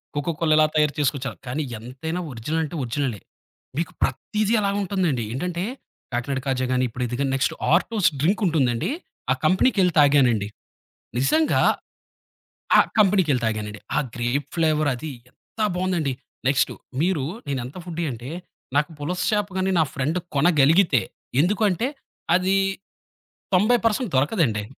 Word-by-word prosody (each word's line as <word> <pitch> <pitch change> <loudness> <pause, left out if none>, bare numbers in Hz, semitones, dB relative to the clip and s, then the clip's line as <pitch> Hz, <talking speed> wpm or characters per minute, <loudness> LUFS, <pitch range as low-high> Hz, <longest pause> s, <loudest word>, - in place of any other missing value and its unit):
Coca Cola 160 +2 -1
ఎలా 155 - +6
తయారు 150 -1 +3
చేసుకోవచ్చారు 135 -4 -1
కానీ, 140 +5 -2 0.2
ఎంతైనా 140 +9 -5
ఒరిజినల్ 130 +8 -2
అంటే 155 +2 -5
ఒరిజినలే. 125 -2 -2 0.6
మీకు 165 +1 -1
ప్రతీది 215 +1 0
ఎలా 200 -1 +1
ఉంటుందండి. 175 - 0
ఏంటంటే, 175 +6 -2 0.5
కాకినాడ 130 +3 -1
కాజా 130 -1 0
గాని, 130 0 +2
ఇప్పుడు 125 +2 -4
ఇదిగాని 135 +3 -1
నెక్స్ట్ 135 - +1 0.2
ఆర్టోస్ 195 0 +3
డ్రింక్ 195 +9 +2
ఉంటుందండి, 130 -8 +1 0.4
ఆ - - +6
కంపెనీకెళ్ళి 185 0 +3
తాగానండి. 130 -8 +4 0.7
నిజంగా, 310 - +3 1.2
ఆ - - +8 0.2
కంపెనీకెళ్ళి 185 - +3
తాగానండి. 105 -1 -3 0.2
ఆ! - - +4 0.2
గ్రేప్ 120 +4 -1
ఫ్లేవర్ 155 -2 +2
అదీ, 150 +4 -6 0.2
ఎంత - - -24 0.2
బావుందండి! 180 -6 0 0.3
నెక్స్ట్ 135 0 +2 0.3
మీరు 170 -5 +1 0.2
నేను 140 -2 -1
ఎంత 130 +8 -9
ఫుడ్డి 170 -1 -4
అంటే, 120 +3 -7 0.5
నాకు 150 +2 +2
పులస 180 +5 -2
చేపగాని, 190 -2 0
నా - - +6
ఫ్రెండ్ 150 +5 -1 0.2
కొనగలిగితే, 155 - +4 0.4
ఎందుకుఅంటే, 205 - +1 0.5
అదీ, 185 +2 +2 1.0
90 215 +7 +5
పర్సెంట్ 225 +1 +1
దొరకదండి. 130 - +2
155 Hz, 130 wpm, -23 LUFS, 130-185 Hz, 1.2 s, ఆ